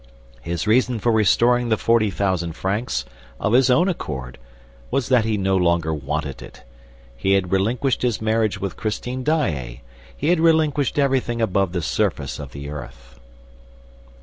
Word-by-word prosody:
His 85 +6 -3
reason 125 +2 +2
for 120 +2 +1
restoring 120 +3 +3
the 110 - +2
forty 115 -1 +2
thousand 95 -3 -1
francs, 95 - -2 0.3
of 105 - 0
his 130 +1 +5
own 170 +9 +4
accord, 65 - -4 0.5
was 135 -4 -1
that 125 -4 +4
he 110 -1 0
no 95 -1 +1
longer 85 -3 +1
wanted 75 -1 -4
it. - - -13 0.5
He 95 +11 +1
had 95 -2 +1
relinquished 115 +7 +1
his 120 -3 0
marriage 110 -2 0
with 100 -1 -4
Christine 125 +4 -3
Daae. 75 - -1 0.4
He 145 - -1
had 175 -1 +3
relinquished 155 -4 +2
everything 130 -4 +1
above 100 -4 +1
the 90 -2 -3
surface 90 -6 -1
of 70 -2 -8
the 70 0 -8
earth." - - -10
105 Hz, 155 wpm, -22 LUFS, 85-125 Hz, 0.5 s, his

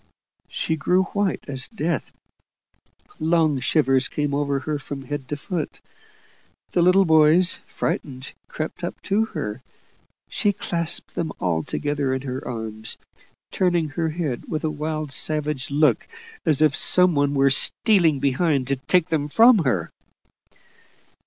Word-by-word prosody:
She 160 - -2
grew 180 +4 +2
white 205 -2 -1
as 135 -2 0
death; 170 -7 -3 1.1
long 160 -3 +2
shivers 135 -2 +2
came 145 -1 -2
over 140 -1 0
her 150 -1 -3
from 135 0 -7
head 145 -2 -5
to 145 - -3
foot. 165 +1 -5 0.9
The 175 - +2
little 185 +2 +5
boys, 160 +2 +4
frightened, 130 -1 -4
crept 155 +3 -6
up 175 - -4
to 210 +3 +1
her; 110 - -5 0.7
she 205 - 0
clasped 170 -4 -1
them 170 -2 -3
all 85 -3 0
together 145 - -2
in 130 - -5
her 130 -1 -5
arms, 110 -2 -5 0.5
turning 175 -4 +1
her 160 +2 -2
head 155 -6 -4
with 155 0 -3
a 155 - 0
wild 155 -1 -4
savage 150 -1 0
look, 150 +2 +2 0.4
as 155 -1 +4
if 150 -1 +3
some 180 -1 +4
one 145 -1 +1
were 135 0 +4
stealing 165 - +3
behind 140 0 0
to 140 - +1
take 180 +6 +1
them 155 -3 0
from 230 - +6
her. 95 -11 0
150 Hz, 140 wpm, -23 LUFS, 135-170 Hz, 1.1 s, from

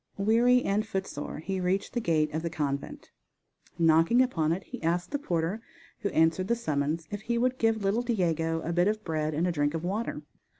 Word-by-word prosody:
Weary 235 +5 +4
and 205 +2 +1
footsore 190 -8 -4
he 190 +5 -3
reached 185 +2 -1
the 240 - -1
gate 155 -6 +1
of 160 - -1
the 170 - -2
convent. 140 -3 -4 0.7
Knocking 165 +7 +4
upon 160 -11 0
it 185 +4 -2
he - - -9
asked 175 +2 -1
the 285 - -1
porter, 175 - -1 0.4
who 200 - -1
answered 160 +3 +2
the 235 - +2
summons, 155 -5 -2
if 205 0 -4
he 235 +2 -1
would 255 +2 +1
give 225 -2 +1
little 200 +4 +1
Diego 165 -8 0
a 170 - -3
bit 175 +2 +3
of 215 +1 -1
bread 155 -3 -2
and 165 +4 +1
a 180 - +1
drink 145 -1 0
of 165 - -3
water. 205 +6 -3
180 Hz, 205 wpm, -28 LUFS, 160-215 Hz, 0.7 s, Weary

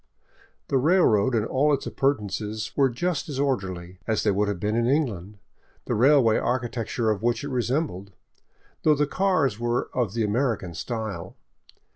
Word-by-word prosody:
The 135 - +2
railroad 130 - +3
and 110 -1 +1
all 140 +5 +2
its 140 - -8
appur 140 +1 +1
tenances 105 +1 -5
were 135 -2 +4
just 160 +6 -2
as 135 -2 -4
orderly 95 -10 -2
as 110 -1 0
they 105 - +3
would 100 +1 +1
have 100 -3 -2
been 105 +3 -1
in 115 0 +1
England, 105 - -1 0.5
the - - -1
railway 125 -2 +4
architecture 120 -2 -1
of 105 - -2
which 120 +4 0
It 145 - -4
resembled, 125 - -2 0.7
though 155 -1 +4
the 150 +1 +2
cars 155 - +1
were 120 +1 -1
of 115 -5 -1
the 115 - +1
American 105 -4 -1
style. 110 -1 -5
120 Hz, 165 wpm, -25 LUFS, 105-140 Hz, 0.7 s, were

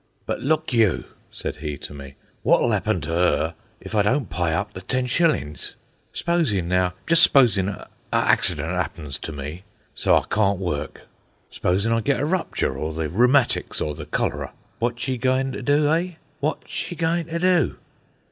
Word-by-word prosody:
"But - - -2
look 155 0 0
you," 110 -7 +3 0.3
said - - -5
he 75 -2 -4
to - - -8
me, 70 -1 -10 0.3
"wot'll - - +4
'appen - - 0
to 80 - -4
'er 85 -2 +2 0.3
if - - -10
I 105 - +4
don't 125 +4 +1
py 90 - 0
up 95 +6 -1
the 95 - -7
ten 125 +7 0
shillings? 125 - 0 0.4
S'posin', 145 - 0
now, 90 0 +1
just 165 0 +4
s'posin' 110 - +5
a 100 - -7 0.2
accident 80 -1 +2
'appens 80 -5 -3
to - - -6
me, 75 +5 -6 0.3
so - - +3
I - - +1
cawn't 100 -2 +1
work. 85 -6 -3 0.5
S'posin' 100 +5 0
I 115 - +2
get 140 +5 +1
a 145 - 0
rupture, 165 - -1
or 75 +3 -3
the 80 -2 -2
rheumatics, 125 - +3
or 75 - -1
the 75 0 -8
cholera. - - -2 0.3
Wot's 120 +1 -1
she 130 -1 -1
goin' 130 +1 +1
to - - -5
do, 145 +1 +3
eh? 175 +2 0 0.3
Wot's 150 +2 -2
she 175 - -3
goin' 165 0 0
to 165 0 -3
do?" 180 -1 +2
105 Hz, 175 wpm, -23 LUFS, -, 0.5 s, s'posin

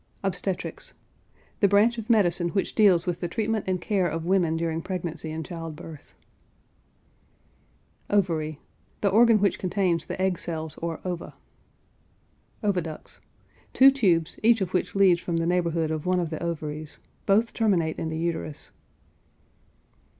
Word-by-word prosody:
OBSTETRICS. - - -3 0.6
The 200 - +5
branch 215 +4 +3
of 225 - -8
medicine 175 -6 +3
which 195 +2 -1
deals 190 -6 +4
with 175 -2 -2
the 175 - -2
treatment 220 +3 -1
and 185 -1 0
care 190 -1 0
of 165 0 -3
women 175 -3 +2
during 165 0 -1
pregnancy 170 -3 -4
and 160 +1 -5
child 165 -3 -6
birth. 155 -2 -12 1.9
OVARY. 160 -7 0 0.4
The 200 - +3
organ 225 +2 +5
which 200 -1 +1
contains 185 -3 0
the - - -5
egg 185 -2 +1
cells 160 -2 -5
or 165 -1 -4
ova. 180 -2 -5 1.3
OVIDUCTS. 180 -6 -3 0.5
Two 270 +1 +8
tubes, 180 - +1
each 225 +1 +5
of 185 -3 -3
which 180 - -1
leads 185 -3 +5
from 170 -2 -2
the 165 - 0
neighborhood 170 -2 0
of 155 +1 -3
one 180 0 +2
of 170 -2 -2
the 160 - -4
ovaries; 155 -3 -4 0.3
both 215 +4 +3
terminate 180 -8 +1
in 160 - -2
the 160 - -3
uterus. 160 -2 -4
175 Hz, 145 wpm, -26 LUFS, 165-200 Hz, 1.9 s, Two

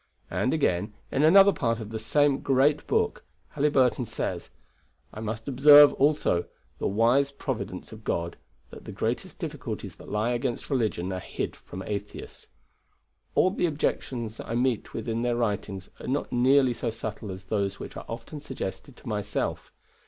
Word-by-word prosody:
And, 100 +8 +1
again, 105 - 0 0.2
in 135 - +1
another 195 +6 +7
part 115 -3 0
of 110 -1 -7
the 110 - -3
same 145 +4 +2
great 140 +2 +2
book, 445 0 0 0.3
Halyburton 135 -5 +2
says: - - -4 0.6
"I - - -7
must 110 0 -5
observe, 145 +2 +8
also, 140 - +2 0.3
the - - 0
wise 120 +7 +3
providence 130 -9 -5
of 110 0 -11
God, 85 -3 -2 0.4
that - - -11
the - - -7
greatest - - -3
difficulties - - -6
that - - -12
lie 105 +4 0
against 120 +2 -2
religion 105 -8 0
are 95 - -3
hid - - -4
from 95 - -9
atheists. 105 0 -6 0.9
All 185 - +4
the 180 - +1
objections 125 -7 -2
I 115 - -4
meet 125 -2 0
with 115 - -4
in 115 0 -1
their 120 0 +1
writings 100 -4 -2
are - - -8
not 140 +3 -1
nearly 130 +1 +4
so 115 - -3
subtle 110 -2 -6
as 95 0 -8
those 100 0 -1
which - - -8
are - - -7
often 115 +6 -6
suggested 135 -2 -6
to - - -14
myself. 105 -2 -2
120 Hz, 165 wpm, -27 LUFS, 105-140 Hz, 0.9 s, observe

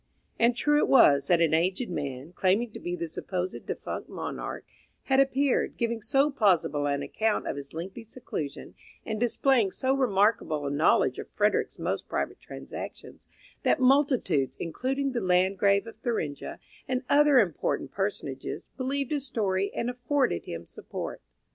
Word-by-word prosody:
And 235 +1 +4
true 295 +3 +3
it - - +2
was 140 - +6
that 175 -2 +4
an 165 -2 +3
aged 185 +7 +1
man, 140 0 -5
claiming 200 +6 +1
to - - -9
be 175 0 -3
the 170 -1 -4
supposed 180 +3 -4
defunct - - -5
monarch, - - -5 0.4
had 265 0 +2
appeared, 275 0 +2
giving 235 -1 -1
so 270 +7 +2
plausible 180 - +2
an 140 0 -1
account 220 -1 -1
of - - -2
his 140 0 -8
lengthy 190 +8 -7
seclusion, 210 - -6 0.3
and 220 -1 -3
displaying 240 -2 +3
so 260 +7 0
remarkable 205 - +2
a 140 - -1
knowledge 150 +3 +3
of - - -7
Frederick's - - 0
most - - -3
private - - -2
transactions, - - -9 0.3
that - - +2
multitudes, 255 - +2
including 270 - -2
the 245 - -2
Landgrave 190 +2 +3
of 225 - -10
Thuringia 190 - -3 0.3
and 255 0 -1
other 295 -1 +5
important 190 - +1
personages, 195 -9 -4
believed 275 +1 -2
his 285 -2 0
story 200 -4 0
and 235 - -3
afforded 250 +2 0
him 85 0 -6
support. - - -7
210 Hz, 155 wpm, -28 LUFS, 170-255 Hz, 0.4 s, was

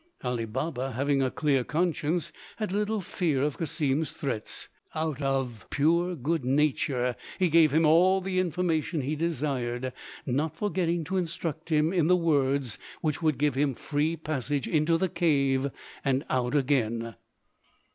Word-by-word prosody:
Ali 125 -2 -1
Baba, 130 +2 -3
having 140 +3 +1
a 130 - +2
clear 140 -2 +1
conscience, 165 +1 -1 0.2
had 215 -4 -2
little 210 +1 0
fear 160 -6 0
of 150 -1 -1
Cassim's 155 -2 0
threats; 120 -7 -4 0.3
but - - -2
out 155 -3 -2
of 135 -5 -1
pure 170 +5 +2
good 155 +1 -1
nature 130 -2 +1 0.2
he 185 -2 +2
gave 160 -2 +5
him 160 +2 +3
all 180 +5 +5
the 185 0 -1
information 170 -3 0
he 140 +4 -2
desired, 130 -6 -2 0.3
not 145 +5 -1
forgetting 175 -3 0
to 190 +5 -2
instruct 165 -2 -3
him 155 +2 +2
in 170 -4 +3
the 180 - +6
words 140 -7 +1 0.2
which 155 +1 -1
would 155 -4 +2
give 145 -1 +2
him 135 0 +1
free 155 +5 -1
passage 145 -3 -2
into 160 +1 +2
the 190 - +1
cave 140 -6 +2 0.3
and 135 +2 +1
out 125 0 0
again. 115 -5 +1
150 Hz, 155 wpm, -28 LUFS, 135-165 Hz, 0.3 s, the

